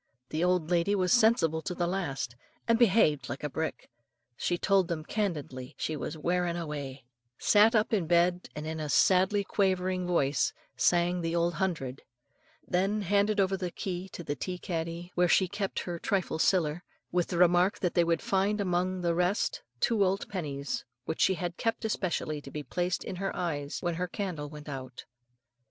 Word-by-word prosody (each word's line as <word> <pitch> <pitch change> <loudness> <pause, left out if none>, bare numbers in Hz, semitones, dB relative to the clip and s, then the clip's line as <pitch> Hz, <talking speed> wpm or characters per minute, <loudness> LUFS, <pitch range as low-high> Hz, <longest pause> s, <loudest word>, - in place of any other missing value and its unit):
The 160 +2 -1
old 180 -2 +1
lady 175 +4 +3
was 185 -2 +2
sensible 220 -10 +4
to 180 +2 -4
the 175 - 0
last, 150 -9 -2 0.3
and 230 0 +3
behaved 185 - +4
like 130 +4 -5
a 150 - -1
brick. 160 +4 -3 0.5
She 175 - -1
told 195 -1 +3
them 160 -3 -3
candidly 150 -12 -3
she 155 - -2
was 150 +1 -5
"wearin' 175 +2 0
awa';" 145 -5 -5 0.4
sat 215 +2 +5
up 215 +1 +2
in 190 -7 +1
bed 175 +1 +2
and 150 +1 -5
in 160 0 -4
a 155 -1 -3
sadly 190 +5 +4
quavering 185 -2 0
voice 145 -5 +1 0.2
sang 175 0 +2
the 165 0 -1
Old 170 0 +2
Hundred; 160 -9 -2 0.7
then 195 +3 +1
handed 200 +2 +2
over 195 0 +3
the 185 -2 -3
key 185 0 -5
of 170 - -8
the 145 - -1
tea 180 +4 -4
caddy, 170 -1 -4
where 180 0 +3
she 190 - +4
kept 200 +1 -3
her 175 -1 -5
"trifle 185 -5 -1
siller," 170 -2 +2 0.3
with 175 -1 +1
the 175 - -3
remark 180 +2 +4
that 180 - -1
they 175 - +4
would 165 -1 0
find 200 +2 +1
among 185 -1 0
the 170 -1 +1
rest 180 +4 0 0.2
two 220 - +3
old 195 +1 0
pennies, 145 -7 -3 0.2
which 160 - -3
she 190 - +4
had 175 -1 -4
kept 225 0 -1
especially 170 -7 -1
to 140 - -10
be 150 +1 -5
placed 175 +6 -1
in 185 - -5
her 195 +1 -2
eyes 150 -5 -2
when 175 -1 0
her 180 +2 -2
"candle 180 -7 -4
went 150 0 -10
out." 130 -3 -7
175 Hz, 185 wpm, -29 LUFS, 160-190 Hz, 0.7 s, sat